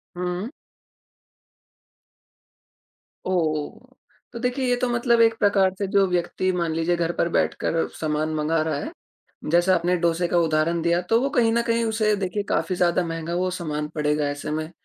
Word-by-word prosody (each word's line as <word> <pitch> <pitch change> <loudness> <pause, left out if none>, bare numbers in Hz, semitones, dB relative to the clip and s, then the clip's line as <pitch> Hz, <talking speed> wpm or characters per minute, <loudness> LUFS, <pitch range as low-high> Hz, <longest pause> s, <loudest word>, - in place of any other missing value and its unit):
हुँ। 180 +5 -3 2.8
ओह! 175 - -2 0.4
तो 235 - -6
देखिए, 250 +2 -1
ये 245 - +3
तो 245 0 -1
मतलब 235 -1 +2
एक 225 0 +4
प्रकार 195 -2 +3
से 200 -1 -2
जो 195 0 +3
व्यक्ति 180 +1 -1
मान 170 -3 -1
लीजिए 165 +2 0
घर 170 0 -1
पर 170 - +1
बैठकर 165 0 0
सामान 155 0 -1
मँगा 155 +1 +1
रहा 155 0 -1
है, 310 - -5 0.6
जैसा 175 +3 +4
आपने 175 +1 +1
डोसे 170 0 +1
का 175 - +2
उदाहरण 165 0 +1
दिया, 170 +1 +2
तो 225 +6 +2
वो 275 - 0
कहीं 230 -5 +2
न 235 +1 +2
कहीं 230 -1 0
उसे 215 -1 +1
देखिए 200 +1 -2
काफ़ी 185 - 0
ज़्यादा 175 0 +2
महँगा 165 +1 -4
वो 185 +1 0
सामान 150 -4 -4
पड़ेगा 150 -1 0
ऐसे 145 +1 -5
में। 155 +1 -3
175 Hz, 170 wpm, -23 LUFS, 165-215 Hz, 2.8 s, एक